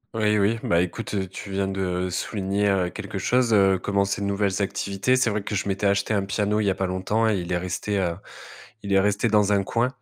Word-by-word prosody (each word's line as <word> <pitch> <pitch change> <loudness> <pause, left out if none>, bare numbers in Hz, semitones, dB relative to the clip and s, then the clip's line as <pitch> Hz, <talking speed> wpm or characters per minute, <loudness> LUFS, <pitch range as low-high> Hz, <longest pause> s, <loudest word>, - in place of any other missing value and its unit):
Oui, 105 -1 +2
oui, 105 +3 +2
bah, 85 - +2
écoute, 95 +2 -2
tu 100 - -8
viens 95 0 -1
de, 95 0 -4
heu, 90 0 -1
souligner, 100 +2 -1
heu, 95 -3 +1
quelque - - -6
chose, 125 -1 +1
heu, 95 -3 +4
commencer 100 +1 0
de 100 - -1
nouvelles 100 0 0
activités. 100 +4 0
C'est 130 -3 +2
vrai 105 +1 -1
que 105 - -4
je 100 - -2
m'étais 100 +1 0
acheté 100 +2 +1
un 100 -2 +1
piano, 105 +1 0
il 105 - 0
y - - +3
a 95 - 0
pas 95 - -1
longtemps 95 +5 0
et 105 -3 +1
il 85 0 -6
est 90 - +2
resté, 90 +3 -2
heu, 90 -3 0 0.7
il 100 - -3
est 95 - +5
resté 105 +3 +1
dans 105 -1 +3
un 100 - +2
coin 115 +5 +1
100 Hz, 245 wpm, -24 LUFS, 95-105 Hz, 0.7 s, est